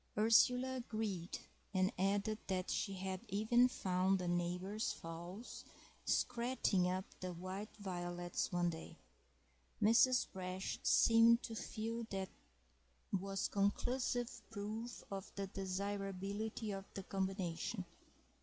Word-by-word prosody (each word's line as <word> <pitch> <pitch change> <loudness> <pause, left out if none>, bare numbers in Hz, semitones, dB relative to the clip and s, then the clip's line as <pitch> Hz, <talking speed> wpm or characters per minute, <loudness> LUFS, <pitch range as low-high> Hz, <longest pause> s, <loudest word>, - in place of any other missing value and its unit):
Ursula 250 +4 +5
agreed, 215 -7 -3 0.4
and 185 +4 +3
added 200 +3 +1
that 185 -1 -1
she 195 - 0
had 190 0 -3
even 220 +5 +4
found 190 -4 +2
the 180 -1 -3
neighbours' 180 +5 0
fowls 175 +7 -7 0.4
scratting 235 -6 +2
up 185 +1 -1
the 185 -1 -4
white 185 +5 -6
violets 175 -2 -2
one 175 -1 +2
day. 160 0 -8 0.8
Mrs. 250 +4 +6
Brash 185 0 -3
seemed 230 +1 +6
to 225 - -5
feel 225 +1 -3
that 190 -1 -2 0.8
was 195 0 0
conclusive 240 +4 0
proof 220 +2 -5
of 195 -1 -5
the 200 - -2
desirability 195 +3 -3
of 195 -1 -4
the 195 - -4
combination. 190 0 -2
195 Hz, 110 wpm, -38 LUFS, 185-225 Hz, 0.8 s, Mrs